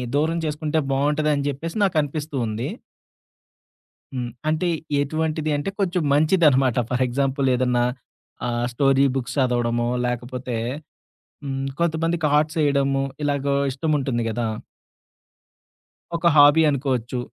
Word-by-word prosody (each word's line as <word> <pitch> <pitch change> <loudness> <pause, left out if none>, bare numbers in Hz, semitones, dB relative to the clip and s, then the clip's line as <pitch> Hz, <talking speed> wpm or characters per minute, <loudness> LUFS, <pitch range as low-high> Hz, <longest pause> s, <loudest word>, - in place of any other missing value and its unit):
దూరం 160 +3 +1
చేసుకుంటే, 155 +1 -1
బావుంటదని 145 +1 +1
చెప్పేసి 165 +7 -5
నాకనిపిస్తూ 155 -4 -1
ఉంది. 110 +2 -3 1.5
హ్మ్. 120 -1 -3 0.2
అంటే 155 +3 0 0.3
ఎటువంటిది 155 +1 -1
అంటే, 145 +6 -3
కొంచెం 180 -2 0
మంచిదనమాట. 145 -5 +3
ఫర్ 125 0 +1
ఎగ్జాంపుల్ 135 +2 0
ఏదన్నా, 125 -1 +1 0.6
ఆహ్, 120 0 -1
స్టోరీ 135 +1 +3
బుక్స్ 130 0 -3
చదవడమో, 120 -2 +1 0.2
లేకపోతే, 125 0 -4 0.9
హ్మ్, 135 -1 -3
కొంతమందికి 165 0 0
ఆర్ట్స్ 155 +2 -1
ఏయడము 140 -1 +1 0.2
ఇలాగా 140 -1 0 0.2
ఇష్టం 150 +4 -2
ఉంటుంది 130 -4 -1
కదా! 115 +1 -2 1.7
ఒక 170 +1 +1
హాబీ 145 +2 +7
అనుకోవచ్చు. 130 -3 -1
140 Hz, 105 wpm, -23 LUFS, 125-155 Hz, 1.7 s, హాబీ